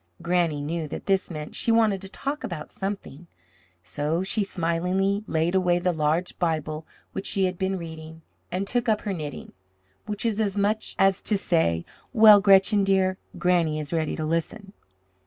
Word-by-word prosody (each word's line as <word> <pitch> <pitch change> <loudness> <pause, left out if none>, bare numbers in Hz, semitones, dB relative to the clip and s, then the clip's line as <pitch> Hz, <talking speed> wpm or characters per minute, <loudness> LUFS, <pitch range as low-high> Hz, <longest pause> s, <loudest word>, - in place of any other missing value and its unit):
Granny 170 -3 0
knew 160 +2 -3
that - - -7
this 195 -1 +1
meant 155 -3 -6
she 230 - +1
wanted 220 -4 +3
to 195 - -9
talk 280 +8 -4
about 155 -4 -6
something, 190 -5 -6 0.6
so 145 - -2
she 205 +3 0
smilingly 185 +3 0
laid 165 +2 0
away 180 -2 +3
the 180 +1 +1
large 160 +2 -1
Bible 155 -2 -2 0.3
which 195 - -3
she 195 -1 +2
had 185 0 -1
been 190 0 0
reading, 160 -1 -9 0.3
and 185 +2 -1
took 240 +2 0
up 215 -1 +2
her 200 - -3
knitting, 150 -5 -6 0.6
which 210 +1 -4
was 220 -1 +1
as 205 -2 -1
much 210 +2 0
as 195 0 +3
to 210 - +1
say: 160 - +1 0.3
"Well, 215 -3 +8
Gretchen, 195 +1 +5
dear, 190 -1 +2 0.2
Granny 170 -4 +2
is 150 +2 -5
ready 160 -2 0
to 155 - -3
listen." 180 +6 -3
180 Hz, 175 wpm, -25 LUFS, 160-200 Hz, 0.6 s, Well